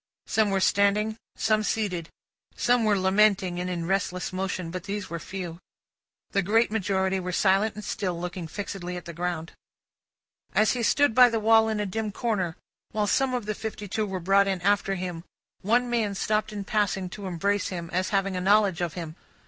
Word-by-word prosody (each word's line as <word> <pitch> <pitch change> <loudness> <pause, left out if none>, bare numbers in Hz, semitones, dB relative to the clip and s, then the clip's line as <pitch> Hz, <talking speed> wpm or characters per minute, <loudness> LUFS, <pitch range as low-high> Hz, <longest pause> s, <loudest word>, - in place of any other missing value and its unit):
Some 220 -2 +2
were 195 -1 +1
standing; 200 +3 +2 0.2
some 215 -1 +2
seated. 195 -6 -2 0.5
Some 245 -1 +2
were 210 -2 +3
lamenting, 190 -1 +3
and 180 0 -2
in 170 -2 -3
restless 180 -1 -1
motion; 185 -2 -3
but, 185 +1 -6
these 205 -2 -4
were 170 - -3
few. 175 -2 -6 0.7
The 200 - +2
great 220 +5 +2
majority 190 -2 0
were 180 0 -4
silent 195 +3 +2
and 210 - -7
still, 180 -4 -2
looking 175 -1 -5
fixedly 180 0 -5
at 175 - -9
the 170 - -7
ground. 170 -1 -3 1.0
As 215 0 +4
he 245 - -1
stood 260 +3 +3
by 250 +1 +8
the 230 -1 0
wall 220 +1 +5
in 215 -1 -1
a 210 - 0
dim 215 +2 -3
corner, 195 -7 -1 0.4
while 210 -1 0
some 260 +4 +1
of 240 -4 -3
the 215 - -1
fifty 210 -1 -6
two 215 +2 -1
were 190 -1 -3
brought 195 +3 +3
in 190 -2 0
after 200 0 +2
him, 180 -2 -5 0.4
one 240 +5 +2
man 225 -4 0
stopped 215 +2 0
in 205 -1 -5
passing, 195 -2 0
to 200 0 -6
embrace 200 +3 0
him, 170 -2 -5
as 185 +2 0
having 195 -1 0
a 180 - -2
knowledge 200 -2 +3
of 170 -3 -2
him. 165 -3 -6
195 Hz, 195 wpm, -26 LUFS, 180-215 Hz, 1.0 s, by